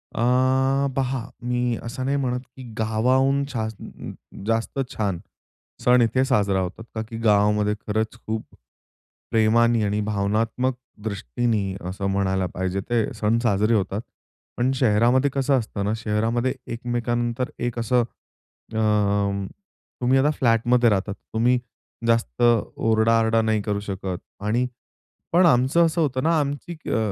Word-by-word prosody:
अ, 115 Hz, -, 0 dB, 0.7 s
पहा 130 Hz, -2 st, -1 dB, 0.2 s
मी 125 Hz, -1 st, 0 dB
असं 130 Hz, +2 st, -5 dB
नाही 140 Hz, +1 st, +1 dB
म्हणत 125 Hz, -2 st, -1 dB, 0.2 s
की 130 Hz, -, -10 dB
गावाहून 130 Hz, +6 st, +2 dB
छान 110 Hz, -2 st, -6 dB, 0.3 s
जास्त 115 Hz, +4 st, -1 dB
छान 100 Hz, -5 st, -1 dB, 0.6 s
सण 125 Hz, 0 st, +5 dB
इथे 130 Hz, +3 st, +2 dB
साजरा 100 Hz, -7 st, +2 dB
होतात. 95 Hz, +5 st, -5 dB
का 110 Hz, -, -1 dB
की 115 Hz, -, -6 dB
गावामध्ये 105 Hz, -1 st, +3 dB
खरंच 110 Hz, +1 st, -1 dB
खूप 110 Hz, 0 st, -2 dB, 0.9 s
प्रेमाने 115 Hz, +1 st, +3 dB
आणि 105 Hz, +1 st, 0 dB
भावनात्मक 110 Hz, +5 st, 0 dB, 0.3 s
दृष्टीनी 100 Hz, -, -1 dB
असं 95 Hz, +1 st, -3 dB
म्हणायला 95 Hz, -1 st, 0 dB
पाहिजे 95 Hz, +1 st, -2 dB
ते 120 Hz, -2 st, +2 dB
सण 110 Hz, +1 st, +1 dB
साजरे 105 Hz, 0 st, +2 dB
होतात. 100 Hz, 0 st, -1 dB, 0.6 s
पण 125 Hz, +2 st, +2 dB
शहरामध्ये 125 Hz, +3 st, +3 dB
कसं 135 Hz, -1 st, +2 dB
असतं 100 Hz, -3 st, -4 dB
ना, 105 Hz, -, 0 dB
शहरामध्ये 115 Hz, +3 st, 0 dB, 0.2 s
एकमेका 120 Hz, 0 st, -2 dB
नंतर 120 Hz, +1 st, -1 dB
एक 120 Hz, -1 st, -2 dB
असं 120 Hz, +1 st, +2 dB, 0.7 s
अं, 100 Hz, -2 st, +1 dB, 0.6 s
तुम्ही 125 Hz, +2 st, +3 dB
आता 145 Hz, -, +3 dB
फ्लॅटमध्ये 120 Hz, -2 st, +3 dB
राहतात, 100 Hz, -1 st, 0 dB, 0.2 s
तुम्ही 120 Hz, +2 st, +3 dB, 0.5 s
जास्त 115 Hz, -, +1 dB, 0.4 s
ओरडा-आरडा 115 Hz, 0 st, +3 dB
नाही 110 Hz, -1 st, +1 dB
करू 105 Hz, -1 st, -2 dB
शकत 95 Hz, -2 st, -4 dB, 0.3 s
आणि 120 Hz, +4 st, +1 dB, 0.7 s
पण 175 Hz, +1 st, +5 dB
आमचं 140 Hz, +5 st, +4 dB
असं 165 Hz, +1 st, -1 dB
होतं 130 Hz, -4 st, 0 dB
ना, 165 Hz, 0 st, +3 dB
आमची 145 Hz, +4 st, -3 dB
अ, -, -, +1 dB
115 Hz, 135 wpm, -23 LUFS, 105-125 Hz, 0.9 s, सण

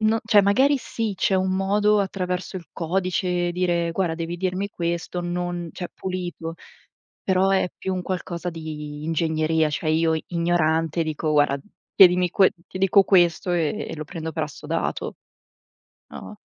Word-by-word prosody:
No, 220 Hz, +1 st, +2 dB
cioè 210 Hz, -2 st, +5 dB
magari 265 Hz, +9 st, +4 dB
sì, 225 Hz, -5 st, -3 dB
c'è 190 Hz, -, +1 dB
un 185 Hz, 0 st, +1 dB
modo 205 Hz, +2 st, +2 dB
attraverso 185 Hz, -1 st, -3 dB
il 175 Hz, -, -8 dB
codice, 180 Hz, 0 st, -1 dB
dire: 175 Hz, -2 st, 0 dB
"Guarda, 175 Hz, -2 st, 0 dB
devi 170 Hz, +1 st, -4 dB
dirmi 185 Hz, +2 st, -2 dB
questo, 170 Hz, -1 st, -3 dB
non" 175 Hz, -1 st, -3 dB
Cioè, 175 Hz, -, -6 dB
pulito, 175 Hz, -3 st, -5 dB, 0.7 s
però 190 Hz, 0 st, +2 dB
è 190 Hz, -2 st, +2 dB
più 190 Hz, -, -3 dB
un 185 Hz, -, -3 dB
qualcosa 180 Hz, -1 st, -4 dB
di 150 Hz, -2 st, -7 dB
ingegneria, 160 Hz, -1 st, +1 dB
cioè 155 Hz, +2 st, -2 dB
io 160 Hz, 0 st, +2 dB
ignorante 165 Hz, -1 st, +1 dB
dico: 155 Hz, 0 st, -2 dB
"Guarda, 145 Hz, -2 st, +3 dB, 0.4 s
chiedimi 180 Hz, -2 st, +6 dB
que 190 Hz, 0 st, +4 dB, 0.2 s
ti 185 Hz, -, -7 dB
dico 195 Hz, +1 st, +5 dB
questo 175 Hz, -1 st, +3 dB
e 170 Hz, +5 st, -1 dB
e -, -, -6 dB
lo 155 Hz, -, -5 dB
prendo 160 Hz, +1 st, -6 dB
per 155 Hz, 0 st, -1 dB
assodato." 150 Hz, +2 st, -4 dB, 0.9 s
No? -, -, -10 dB
175 Hz, 155 wpm, -24 LUFS, 165-190 Hz, 0.9 s, chiedimi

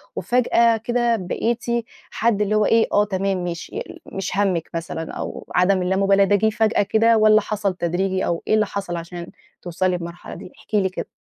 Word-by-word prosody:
وفجأة 235 Hz, +2 st, +2 dB
كده 240 Hz, +1 st, 0 dB
بقيتِ 230 Hz, +5 st, -2 dB, 0.5 s
حد 225 Hz, -2 st, +1 dB
اللي 210 Hz, +1 st, +1 dB
هو 215 Hz, -1 st, +3 dB
إيه، 230 Hz, 0 st, +4 dB
آه، 205 Hz, -, +4 dB
تمام، 195 Hz, -2 st, -1 dB
ماشي. 175 Hz, -1 st, -6 dB
يل -, -, -7 dB
مش 195 Hz, 0 st, -5 dB
هَمِّك 185 Hz, -5 st, 0 dB
مثلًا، 165 Hz, -1 st, -5 dB
أو -, -, -6 dB
عدم 185 Hz, +1 st, +3 dB
اللامُبالاة 195 Hz, +2 st, +3 dB
ده 205 Hz, -, +3 dB
جيه 220 Hz, +2 st, +2 dB
فجأة 220 Hz, 0 st, +1 dB
كده، 225 Hz, +3 st, +3 dB
والّا 215 Hz, 0 st, +5 dB
حصل 205 Hz, -2 st, -2 dB
تدريجي؟ 185 Hz, +2 st, -1 dB
أو 170 Hz, -1 st, -2 dB
إيه -, -, +2 dB
اللي 215 Hz, -1 st, +3 dB
حصل 195 Hz, -3 st, -4 dB
عشان 170 Hz, +1 st, -8 dB, 0.3 s
توصلي 180 Hz, +1 st, -1 dB
بمرحلة 170 Hz, 0 st, -8 dB
دي، -, -, -11 dB
احكِ -, -, -6 dB
لي 195 Hz, -2 st, +2 dB
كده؟ 185 Hz, -, -6 dB
195 Hz, 185 wpm, -21 LUFS, 180-215 Hz, 0.5 s, والّا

